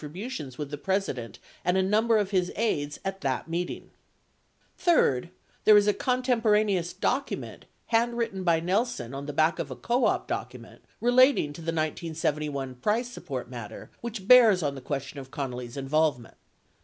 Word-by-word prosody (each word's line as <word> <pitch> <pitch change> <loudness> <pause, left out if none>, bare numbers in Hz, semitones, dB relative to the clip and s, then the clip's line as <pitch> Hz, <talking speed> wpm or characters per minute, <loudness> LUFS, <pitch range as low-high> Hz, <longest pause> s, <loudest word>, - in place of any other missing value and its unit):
654 185 - -6
butions 130 - -13
with 145 -2 -5
the 145 - -5
President 165 - -2 0.3
and 180 +2 +2
a 190 - +3
number 220 +4 +3
of 205 -2 0
his 180 -2 +1
aides 150 -10 -1
at 195 0 -3
that 135 0 -2
meeting 170 +2 -4 0.8
Third, 170 - +2 0.3
there 215 -1 +8
is 205 - +5
a 210 - +4
contemporaneous 215 -8 +1
document 275 +9 -3 0.2
handwritten 230 -4 0
by 170 -2 +3
Nel 190 +7 +2
son 130 - -7
on 140 +1 -6
the - - -3
back 155 +4 +2
of 160 -4 -3
a 130 - -6
co 240 - 0
op - - +1
document - - -6 0.2
relating 245 - +4
to 165 - -10
the - - -10
1971 155 -4 -2
price 220 - 0
support 245 - -6
matter - - -9
which 220 -5 -6
bears 225 -8 +7
on 145 -2 0
the 135 - -8
question 140 +1 -4
of 130 -1 -10
Connally's 125 -3 -5
involve 150 +1 +2
ment. 120 - -15
175 Hz, 170 wpm, -27 LUFS, 145-220 Hz, 0.8 s, there